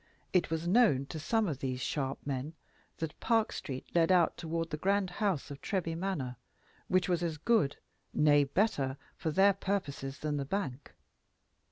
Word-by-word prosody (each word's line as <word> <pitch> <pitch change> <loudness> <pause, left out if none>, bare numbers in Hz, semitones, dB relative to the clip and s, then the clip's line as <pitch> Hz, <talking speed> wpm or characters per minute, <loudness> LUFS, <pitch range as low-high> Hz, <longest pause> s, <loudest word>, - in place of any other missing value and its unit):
It 180 - +3
was 160 +1 -2
known 180 - +4
to 160 - -5
some 220 +7 +1
of 145 -6 -3
these 130 -2 -2
sharp 135 +2 -2
men 140 +3 -3 0.4
that 160 -2 -5
Park 225 -2 +2
Street 130 -3 -5
led 170 0 +4
out 175 -3 +4
toward 165 0 -3
the 150 - -2
grand 195 +2 +1
house 190 -8 -1
of 140 - -8
Treby 180 -5 -1
Manor, 165 -9 -3 0.5
which 185 -1 +2
was 175 -2 +1
as 165 -3 -1
good 200 -5 +2 0.3
nay, 145 -1 +5
better, 140 -5 +1 0.2
for 160 - -2
their 195 +5 +5
purpose 195 -7 -2 0.2
than 150 -1 -2
the 140 - -1
bank. 145 -6 -4
165 Hz, 170 wpm, -32 LUFS, 140-190 Hz, 0.5 s, nay